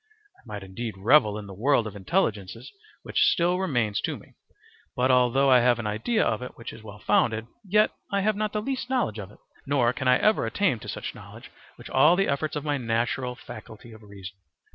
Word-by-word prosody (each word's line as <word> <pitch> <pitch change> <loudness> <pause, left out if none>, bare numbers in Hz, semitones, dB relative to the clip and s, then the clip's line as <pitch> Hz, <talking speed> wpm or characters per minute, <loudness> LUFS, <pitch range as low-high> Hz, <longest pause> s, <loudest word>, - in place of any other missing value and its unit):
I - - -25
might 105 -2 -7
indeed 105 +4 -6
revel 105 0 +4
in 105 - -7
the 100 - -9
world 120 +4 +2
of 105 -1 -7
intelligences 110 - -2 0.3
which - - -2
still 175 +1 +3
remains 120 - 0
to - - -3
me, - - -18 0.6
but 130 +1 +2
although 130 +2 +4
I 125 - +7
have 120 -1 +3
an 115 - -5
idea 110 - 0
of 110 +1 -1
it 125 - -8
which 115 - -8
is - - -12
well 105 -1 -11
founded, 110 +1 +1 0.2
yet 210 +2 +3 0.2
I 200 0 +1
have 215 +1 +1
not 210 0 -2
the 210 0 -2
least 260 0 -3
knowledge 240 - 0
of 95 -2 -7
it, 105 - -17 0.3
nor 130 -4 +2
an 130 - -2
I 125 0 +6
ever 215 0 +2
attain 190 - 0
to - - -9
such - - -5
knowledge - - -13 0.3
with - - -11
all 150 +6 +5
the 195 +1 +1
efforts 150 +2 -1
of 150 0 -4
my 145 -2 0
natural 120 +2 -1
faculty 115 -1 -11
of 110 0 -14
reason. 100 -2 -11
125 Hz, 215 wpm, -26 LUFS, 110-155 Hz, 0.6 s, I